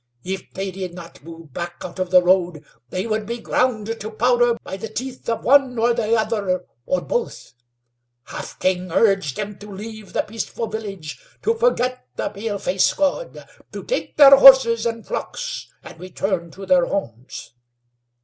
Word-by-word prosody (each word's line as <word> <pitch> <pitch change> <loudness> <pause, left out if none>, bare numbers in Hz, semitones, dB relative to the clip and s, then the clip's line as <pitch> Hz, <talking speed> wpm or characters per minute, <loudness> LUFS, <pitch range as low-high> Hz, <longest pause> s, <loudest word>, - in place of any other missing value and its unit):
If 190 +1 -5
they 195 0 -3
did 185 -2 -6
not 170 -4 -12
move 165 -3 -12
back 175 +2 -5
out 180 +1 -8
of 185 -1 -1
the 180 0 +6
road 175 -4 +1 0.2
they 185 - -3
would 215 -2 -2
be 235 +1 -3
ground 235 -2 0
to 215 - -5
powder 240 +1 +2
by - - -6
the 215 +3 -7
teeth 255 +4 -6
of 230 - -2
one 265 -2 +4
or 235 +1 +3
the 230 -1 +1
other, 210 -5 -1 0.2
or 275 - +1
both. 485 - -4 0.7
Half - - -8
King 185 -1 -1
urged 195 - +2
them 210 -1 -5
to 205 +1 -11
leave 215 +1 -9
the - - +1
peaceful 225 +1 -5
village, 200 -8 -7 0.2
to 455 - +2
forget 355 - 0
the - - -2
paleface 200 -3 0
God; 295 - -2 0.2
to - - -7
take - - -3
their 275 -2 +9
horses, 260 -4 +7
and 230 -1 -4
flocks, - - -5
and - - -12
return 185 -1 -3
to 195 +4 -10
their 180 -2 +3
homes. 120 - -5
210 Hz, 170 wpm, -21 LUFS, 185-235 Hz, 0.7 s, their